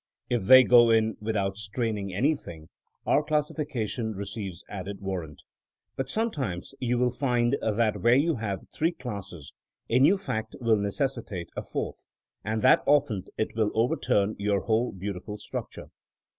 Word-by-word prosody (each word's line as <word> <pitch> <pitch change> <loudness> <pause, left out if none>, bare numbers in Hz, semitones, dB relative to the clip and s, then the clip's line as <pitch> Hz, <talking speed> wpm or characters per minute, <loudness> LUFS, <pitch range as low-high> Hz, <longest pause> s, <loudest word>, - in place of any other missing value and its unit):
If 120 -6 0
they 130 +4 +9
go 120 -1 +6
in 110 -1 +3
without 100 -3 -1
straining 105 -1 -3
anything, 95 - -2 0.4
our - - +3
classification 145 -7 -2
receives 100 -2 -6
added 100 0 -6
warrant. 90 -6 -5 0.5
But 135 0 -3
sometimes 135 - -2
you 125 -1 0
will 125 0 +2
find 125 -1 +1
that 110 0 0
where 120 +1 +5
you 150 +2 +2
have 100 -4 -4
three 165 +3 +1
classes 100 - -8 0.4
a 125 - +4
new 165 +9 +5
fact 110 - -4
will 115 -2 +3
necessitate 105 - -3
a - - -3
fourth, - - -5 0.4
and 110 0 -2
that - - +6
often 140 -9 +2
it 110 - -2
will 110 -2 +2
overturn 110 -2 +1
your 100 -1 +1
whole 115 +4 +1
beau 100 +2 -4
tiful 105 +3 -7
structure. 105 - -7
110 Hz, 150 wpm, -27 LUFS, 100-125 Hz, 0.5 s, they